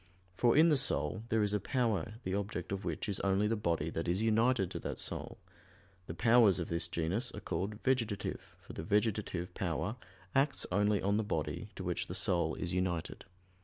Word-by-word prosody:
For 120 +5 +3
in 165 +2 +7
the 150 -3 +4
soul 105 - +1
there 110 -1 +2
is 105 0 +1
a 105 - +2
power 110 -3 -1
the 95 - -2
object 100 -3 -3
of 100 0 -3
which - - -3
is 100 -2 -1
only 100 +1 +2
the 110 +2 +1
body 85 -6 -1
that 80 +2 -3
is 90 +2 +1
united 110 -2 +2
to - - -4
that - - -4
soul; - - -3 0.7
the 80 - -5
powers 115 -2 +5
of 85 - -3
this 85 0 +1
genus 85 +9 -1
are - - -6
called 95 +2 -3
"vegetative" 115 -6 -1
for - - -12
the - - -5
vegetative 100 -2 0
power 90 +5 -2 0.4
acts 140 +1 +2
only 105 +2 +2
on 100 +1 +2
the 110 - +1
body 105 +1 -3
to 95 - -6
which 90 0 -1
the 90 - -5
soul 85 -3 +1
is 90 -2 -4
united. 90 -3 -2
100 Hz, 200 wpm, -33 LUFS, 90-110 Hz, 0.7 s, in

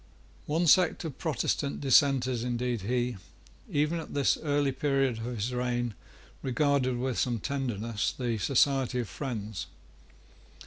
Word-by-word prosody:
One 160 +4 +1
sect 175 +1 +4
of 150 -5 -6
Protestant 140 -1 -1
Dissenters 130 -3 +3
indeed 120 -2 -1
he, 120 +2 -1 0.5
even 150 +3 +1
at 160 - -8
this 140 -1 +3
early 145 -2 +1
period 135 -3 0
of 115 - -5
his 120 0 -3
reign, 120 -1 -1 0.5
regarded 135 -1 +1
with 130 0 -1
some 120 -3 0
tenderness, 115 -5 -2
the 120 -4 -2
Society 135 0 +2
of 115 - -5
Friends. 110 - -5
130 Hz, 130 wpm, -29 LUFS, 120-140 Hz, 0.5 s, sect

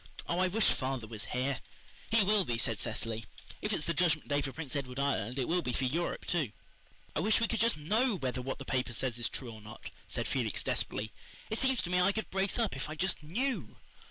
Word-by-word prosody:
Oh, 170 - +1
I 185 - +4
wish 210 +4 +4
father 130 -3 -1
was 110 -2 -6
here." 130 +4 -1 0.5
"He 225 -1 +5
will 205 0 +4
be," 120 -8 -1
said 115 -2 +1
Cecily. 115 -1 -3 0.4
"If - - -1
it's 150 - +1
the 170 - +1
Judgment 155 -3 +2
Day 145 0 +3
for 140 -1 -3
Prince 150 0 -4
Edward 130 -3 -3
Island 140 -4 0
it 130 - 0
will 175 +2 +2
be 125 - -2
for 135 - 0
Europe, 160 +7 0
too." 155 -10 +1 0.6
"I - - +2
wish 215 +7 +4
we 230 - +3
could 230 - -1
just 230 -4 +4
KNOW 215 - +2
whether 130 -6 -2
what 135 +2 -3
the - - -7
paper 125 -2 0
says 120 0 0
is 120 - +1
true 125 -3 -5
or 110 -1 -10
not," 105 +1 -9 0.2
said - - -1
Felix - - 0
desperately. 110 +1 -1 0.4
"It 220 - +3
seems 265 -2 +3
to 175 - -3
me 180 0 +4
I 195 +3 +4
could 220 - -3
brace 190 +1 +2
up 225 - +1
if 135 - -4
I 155 - -4
just 185 +3 0
KNEW." 240 - -1
150 Hz, 240 wpm, -33 LUFS, 125-190 Hz, 0.6 s, He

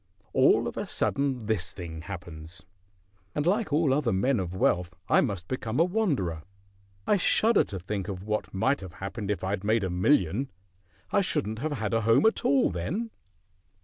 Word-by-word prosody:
All - - +4
of - - -6
a - - -3
sudden 135 -4 -1
this 100 -5 -1
thing 80 -4 -7
happens, 85 -1 -8 0.7
and 145 - 0
like 200 0 +1
all 150 -2 +3
other 135 -4 +1
men 115 +6 +2
of 90 -1 -4
wealth 90 -2 +1
I - - +5
must 90 -4 -3
become 120 -1 -2
a - - +7
wanderer. 155 - 0 0.6
I 205 - +3
shudder 220 +4 +4
to 95 0 -6
think 95 +1 -4
of 95 -2 -5
what 105 +1 -2
might 130 +8 +1
have 95 -3 -8
happened 100 +2 -5
if 105 - -1
I'd 95 +1 -2
made 110 +1 +2
a 95 - -1
million; 95 - +2 0.6
I - - +4
shouldn't 110 +2 -1
have 155 +3 -2
had 110 -6 -2
a 115 - +2
home 115 - +4
at 220 - +3
all 140 -6 +3
then." 180 - -3
105 Hz, 180 wpm, -28 LUFS, 90-140 Hz, 0.7 s, a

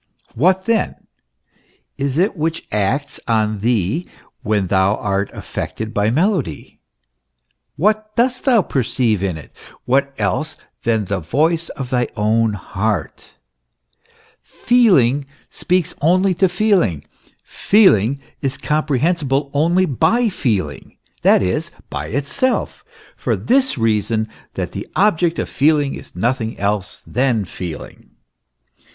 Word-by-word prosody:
What 185 +8 +2
then 230 -3 +1 1.0
is 140 0 -2
it 190 +5 +2
which 165 0 -2
acts 105 +8 -1
on 110 -2 +1
thee 115 - 0 0.3
when 105 -2 0
thou 95 +2 +2
art 100 -1 -1
affected 110 0 -5
by 105 +1 +1
melody? 155 - -1 1.0
What 215 +4 0
dost 250 +1 +1
thou 240 -7 +4
perceive 120 - 0
in 95 -4 -1
it? 80 - -13 0.3
What 140 +2 +2
else 155 +2 -1 0.2
than 110 -2 0
the 100 0 -2
voice 160 - 0
of 130 -2 -6
thy 125 -1 +1
own 110 +1 +2
heart? 105 -3 -3 1.1
Feeling 145 - +3 0.3
speaks 180 -2 0
only 185 +5 +3
to 185 +2 +2
feeling; 175 - +1 0.4
feeling 140 - +3 0.2
is 135 -1 -1
comprehensible 150 -1 0
only 170 +6 +3
by 230 - +2
feeling, 115 - -3 0.2
that - - +4
is, 90 0 -1 0.2
by 75 +2 -4
itself 145 - -1 0.3
for - - -1
this 265 - +1
reason, 110 -1 +1 0.3
that - - -3
the - - -6
object 175 -4 +2
of - - -2
feeling 145 -1 +2
is - - -10
nothing 115 +3 -1
else 100 0 -2
than 125 -5 0
feeling. 85 -2 -8
135 Hz, 120 wpm, -19 LUFS, 105-175 Hz, 1.1 s, thou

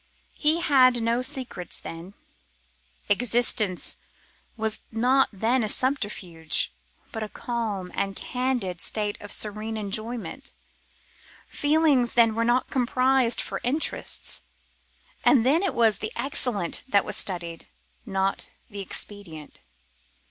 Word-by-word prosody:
He 315 +3 +3
had 255 -5 +5
no 230 +2 +1
secrets 255 - -3
then. 170 +4 -9 0.9
Existence 215 -4 +2 0.6
was 220 -1 -2
not 250 +4 +3
then 230 +5 +1
a 215 - 0
subterfuge, 205 - -1 0.4
but 220 - -5
a 215 - -3
calm 215 -7 -3
and 195 0 -1
candid 245 -9 -2
state 210 -1 -1
of 205 - -9
serene 215 +1 -2
enjoyment. 225 +5 -4 1.0
Feelings 290 -5 +3
then 230 -2 +5
were 230 +1 0
not 240 +2 +2
compromised 255 -1 +2
for - - -4
interests; 285 +6 0 0.8
and 250 -6 +5
then 300 +6 +4
it 390 -4 -1
was 225 -3 +3
the 215 - -3
excellent 240 -10 0
that 200 -6 +3
was - - -3
studied, 170 -3 -4 0.4
not 195 -3 -1 0.2
the 200 - -6
expedient. 190 -5 -5
225 Hz, 115 wpm, -26 LUFS, 200-255 Hz, 1.0 s, had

